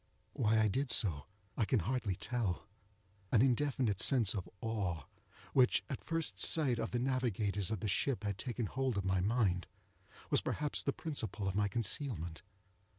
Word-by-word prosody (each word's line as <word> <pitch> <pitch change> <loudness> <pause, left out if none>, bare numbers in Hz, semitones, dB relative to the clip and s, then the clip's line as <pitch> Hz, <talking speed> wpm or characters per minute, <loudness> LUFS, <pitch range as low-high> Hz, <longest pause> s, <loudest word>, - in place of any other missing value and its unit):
Why 110 -1 +2
I 110 - +4
did 130 +7 -1
so 80 -11 +3 0.3
I - - +1
can 110 +1 +2
hardly 120 -7 -1
tell. 105 -5 -2 0.6
An 115 0 +5
indefinite 130 -5 +1
sense 115 -7 +4
of 95 -4 -4
awe, 95 -8 -2 0.5
which 125 -2 +4
at 135 - -5
first 165 -1 -2
sight 135 -7 +4
of 115 - -2
the 120 - -1
navigators 115 -7 0
of 110 -4 -3
the - - -1
ship 115 +3 0
had 100 -2 -3
taken 120 -1 -2
hold 130 +1 -1
of 100 - -1
my 95 0 +2
mind, 95 -5 +1 0.6
was - - +4
perhaps 150 -1 -1
the 140 - 0
principle 115 - -4
of 95 - -1
my 105 +1 +2
concealment. 105 - -3
110 Hz, 165 wpm, -35 LUFS, 100-130 Hz, 0.6 s, An